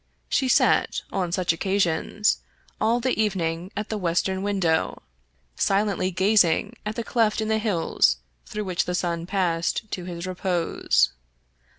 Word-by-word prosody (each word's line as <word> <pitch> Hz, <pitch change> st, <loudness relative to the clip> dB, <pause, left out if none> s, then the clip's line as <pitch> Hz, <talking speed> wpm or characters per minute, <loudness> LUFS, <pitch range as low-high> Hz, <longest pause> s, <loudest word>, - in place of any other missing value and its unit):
She 265 Hz, -, +1 dB
sat, 255 Hz, -, +3 dB
on 185 Hz, -3 st, -1 dB
such 175 Hz, -1 st, +1 dB
occasions, 190 Hz, +2 st, +1 dB, 0.4 s
all 230 Hz, +3 st, +2 dB
the 245 Hz, -2 st, 0 dB
evening 175 Hz, -3 st, -1 dB
at 210 Hz, +1 st, -3 dB
the 215 Hz, -, -2 dB
western 185 Hz, +1 st, 0 dB
window, 190 Hz, -5 st, 0 dB, 0.5 s
silently 195 Hz, -, +1 dB
gazing 195 Hz, +2 st, +3 dB
at 215 Hz, -, -3 dB
the 235 Hz, -, -3 dB
cleft 225 Hz, -2 st, +1 dB
in 220 Hz, 0 st, -1 dB
the 220 Hz, 0 st, +2 dB
hills 170 Hz, -, +2 dB, 0.3 s
through 210 Hz, -, -4 dB
which 185 Hz, -3 st, -1 dB
the 180 Hz, -, -2 dB
sun 170 Hz, -1 st, -2 dB
passed 180 Hz, +2 st, -1 dB
to 180 Hz, -, -4 dB
his 175 Hz, -1 st, -5 dB
repose. 175 Hz, -, +1 dB
190 Hz, 145 wpm, -25 LUFS, 170-210 Hz, 0.5 s, sat